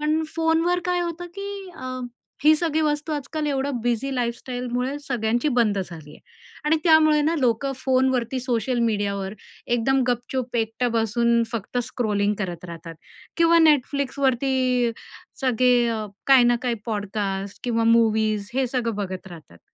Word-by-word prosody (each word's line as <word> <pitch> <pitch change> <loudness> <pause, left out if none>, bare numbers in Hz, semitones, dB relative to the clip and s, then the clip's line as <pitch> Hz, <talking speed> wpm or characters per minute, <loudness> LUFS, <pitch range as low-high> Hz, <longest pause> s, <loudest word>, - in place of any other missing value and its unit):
पण 305 +1 +1
फोनवर 330 +2 +2
काय 360 0 0
होतं 345 0 -4
की 400 0 -5 0.3
अ, 255 - -7 0.6
ही 310 +1 +7
सगळी 315 -1 0
वस्तू 300 +1 -1
आजकाल 300 +1 -3
एवढं 275 -3 -1
बिझी 245 +3 -1
लाईफस्टाईलमुळे 250 +2 -3
सगळ्यांची 240 -1 0
बंद 210 -4 +2
झाली 165 -5 -7
आहे - - -15 0.4
आणि 305 +2 +3
त्यामुळे 315 -2 +5
ना, 315 +3 +1
लोकं 255 +2 +1
फोनवरती 260 -1 +1
सोशल 245 0 -1
मीडियावर 200 -2 -2 0.3
एकदम 250 +3 +2
गपचूप 245 0 -2
एकटं 225 +2 0
बसून 235 +1 +2
फक्त 230 +2 -3
स्क्रॉलिंग 210 -5 0
करत 180 -4 -4
राहतात. 165 -1 -8 0.4
किंवा 335 0 +5
Netflixवरती 265 -3 +1 0.5
सगळे 250 -1 +3
अ, 220 -2 -2 0.2
काही 265 -3 +7
ना 240 0 +4
काही 245 -2 0
पॉडकास्ट 200 -2 -3
किंवा 230 -2 +1
मूव्हीज 215 -2 +1
हे 265 0 +1
सगळं 235 -2 -2
बघत 190 -2 -5
राहतात. 155 - -13
245 Hz, 140 wpm, -23 LUFS, 220-275 Hz, 0.6 s, ही